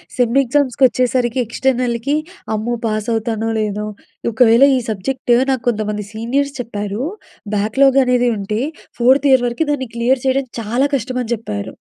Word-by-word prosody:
Sem 245 +1 +1
ఎగ్జామ్స్‌కొచ్చేసరికి 255 -2 +1
ఎక్స్టర్నల్‍కి 250 +2 0 0.4
అమ్మో! 225 +3 -1
Pass 215 0 -2
అవుతానో 225 0 -1
లేనో, 210 0 -2 0.4
ఒకవేళ 230 +2 +5
ఈ - - +1
సబ్జెక్ట్ 240 +5 -1 0.2
నాకు 260 -3 -1
కొంతమంది 210 -2 -1
సీనియర్స్ 270 +6 -1
చెప్పారు. 210 -2 -4 0.5
బ్యాక్‌లాగ్ 265 +7 +3
అనేది 250 -1 +2
ఉంటే 210 +3 -2 0.4
ఫోర్త్ 265 +4 +4
ఇయర్ 255 -2 +5
వరకు 240 +7 -1
దాన్ని 260 -4 -2
క్లియర్ 245 +2 +1
చేయడం 265 0 +1
చాలా 240 +6 +1
కష్టమని 255 -2 -3
చెప్పారు. 105 - -6
240 Hz, 130 wpm, -18 LUFS, 220-260 Hz, 0.5 s, ఒకవేళ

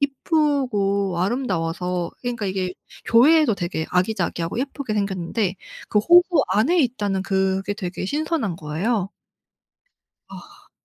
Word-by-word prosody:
이쁘고 255 - 0
아름다워서그러니까 185 +1 -2
이게 185 -1 -2 0.3
교회도 280 +1 +5
되게 175 -3 -3
아기자기하고 180 -1 -1
예쁘게 270 -3 -3
생겼는데 195 0 -1 0.3
그 210 - +2
호수 345 - +5
안에 290 - +2
있다는 205 -7 -1
그게 190 +1 0
되게 185 -2 -5
신선한 295 - -1
거예요. 185 +7 -2 1.2
아. - - -14
205 Hz, 280 characters per minute, -22 LUFS, 185-260 Hz, 1.2 s, 교회도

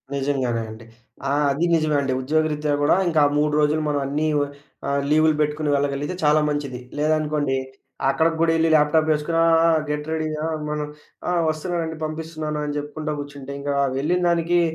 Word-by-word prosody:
నిజంగానే 135 -4 0
అండి. 110 +1 -11 0.4
ఆ! - - +1 0.2
అదీ 150 +5 0
నిజమే 155 -2 +2
అండి. 130 -2 -1
ఉద్యోగ 155 +4 +1
రీత్యా 150 0 -1
గూడా 145 - +4
ఇంకా 160 -3 +3 0.2
3 150 0 +1
రోజులు 150 +1 +2
మనం 145 -1 0
అన్నీ 150 +3 0
ఒ - - +3 0.5
ఆహ్, 140 0 +1
లీవులు 155 0 +4
బెట్టుకొని 150 0 0
వెళ్ళగలిగితే 140 +4 -1
చాలా 150 +1 +4
మంచిది. 140 -4 -3 0.2
లేదనుకోండి 150 -3 +1 0.5
అక్కడికి 160 +4 +2
గూడా 165 0 +4
ఎళ్లి 165 0 +2
ల్యాప్‌టాపేసుకొని 155 +1 +2
ఆ! - - +4 0.2
ఆ! - - +5 0.2
గెట్ 150 +1 -3
రెడీయా? 155 -1 -2 0.2
మనం 150 0 -2 0.4
ఆ! - - +1 0.2
వస్తన్నామండి 160 0 -3
పంపిస్తున్నానని 155 -2 -4
జెప్పుకుంటా 150 +1 -4
గూర్చుంటే 145 -1 -7
ఇంకా 145 0 -2 0.2
వెళ్ళినదానికి 175 +2 +2
150 Hz, 155 wpm, -23 LUFS, 145-155 Hz, 0.5 s, ఆ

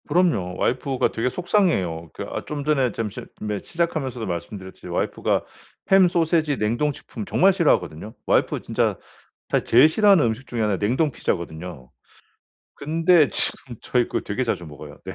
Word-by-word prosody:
그럼요. 150 - +1
와이프가 130 +1 0
되게 115 +3 -1
속상해해요. 125 - 0
그 - - -6
아 - - -5
좀 145 -1 -4
전에 135 -5 +2
잠 110 0 -3
잠 100 - -9
네 105 -1 -3
시작하면서도 155 -9 -2
말씀드렸지만 95 +1 -6
와이프가 - - 0 0.5
햄, 190 -1 +7
소시지, 160 -4 +1
냉동식품 120 0 -2
정말 190 - +4
싫어하거든요. 105 - 0
와이프가 - - +1
진짜 - - 0 0.5
사실 - - +1
제일 125 +6 +7
싫어하는 195 - +4
음식 115 +4 -3
중에 120 - -3
1 105 -1 +1
가 - - -10
냉동 130 +9 +1
피자거든요. 80 - -4 0.8
근데 165 +1 +3
지금 120 -3 -2
저희 125 -1 +1
그거 - - -2
되게 105 +5 -2
자주 90 -7 -2
먹어요. 75 -2 -11
네. - - -6
125 Hz, 380 characters per minute, -23 LUFS, 100-160 Hz, 0.8 s, 햄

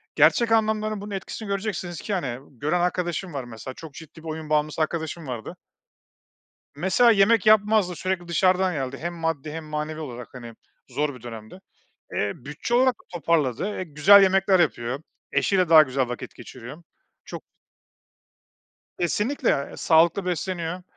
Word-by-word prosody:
gerçek 235 -1 +4
anlamların 215 -1 +1
bunun 205 0 -8
etkisini 200 +2 -6
göreceksiniz 195 -4 -3
ki, 210 - -4
hani, 130 -10 -2 0.2
gören 155 +5 0
arkadaşım 180 -1 -2
var 135 -2 -4
mesela 120 +2 -9
çok 160 -1 -11
ciddi 160 +1 -13
bir - - -9
oyun 155 -1 -6
bağımlısı 150 +1 0
arkadaşım 160 0 -3
vardı 120 -4 -6 1.2
mesela 190 +9 +4
yemek 215 0 +4
yapmazdı 210 -3 +4
sürekli 185 -2 -3
dışarıdan 185 +1 +2
yerdi 135 -2 -4
hem 175 +2 -4
maddi 165 -3 -3
hem 160 0 -6
manevi 150 +1 -4
olarak, 125 -5 -7
hani, 120 -3 -10 0.3
zor 145 +3 -2
bir 125 - -14
dönemdi. 115 - -10 0.5
Eee, 100 -1 0
bütçe 150 - -5
olarak 255 0 +4 0.2
toparladı, 150 -6 0
eee, 185 - -3
güzel 175 +6 +6
yemekler 190 -1 +4
yapıyor 120 -3 0 0.3
eşiyle 185 -4 +2
daha 160 -2 +9
güzel 130 -2 -1
vakit 125 - -7
geçiriyor 130 +6 -11 0.4
çok - - -8 1.6
Kesinlikle, 210 - 0
e, - - -10
sağlıklı 170 +3 +3
besleniyor 180 0 -3
165 Hz, 145 wpm, -24 LUFS, 140-190 Hz, 1.6 s, daha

